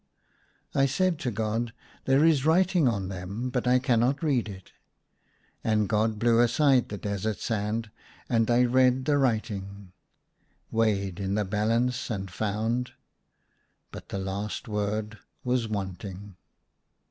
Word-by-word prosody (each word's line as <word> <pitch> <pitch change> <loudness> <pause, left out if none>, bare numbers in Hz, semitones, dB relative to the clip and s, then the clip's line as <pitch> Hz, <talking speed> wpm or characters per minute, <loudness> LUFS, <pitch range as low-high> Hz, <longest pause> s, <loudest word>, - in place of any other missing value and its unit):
I 135 0 +3
said 175 +4 +1
to 135 - -1
God, 115 +1 -2 0.2
" - - -28
There 135 +3 +4
is 155 -5 +4
writing 175 0 +3
on 100 -5 -1
them, 100 +6 -5
but 125 0 -1
I 125 +1 +5
cannot 125 +3 +1
read 130 -8 +1
it." 95 -2 -11 0.9
And 105 -2 +2
God 110 +1 +1
blew 115 +1 +3
aside 125 +2 +3
the 105 - -5
desert 100 +1 -2
sand, 110 0 -2 0.4
and 115 -1 +1
I 120 +1 +4
read 130 +1 +3
the 145 0 +2
writing: 100 -6 -2 0.4
" - - -42
Weighed 100 -5 0
in 100 0 -1
the 105 -1 0
balance, 115 +5 0
and 95 -4 -4
found 110 +6 -2 0.5
" - - -45
but - - -10
the - - -3
last 100 +2 -4
word 105 0 -2 0.2
was 125 -2 0
wanting. 100 -1 -5
110 Hz, 145 wpm, -27 LUFS, 100-125 Hz, 0.9 s, I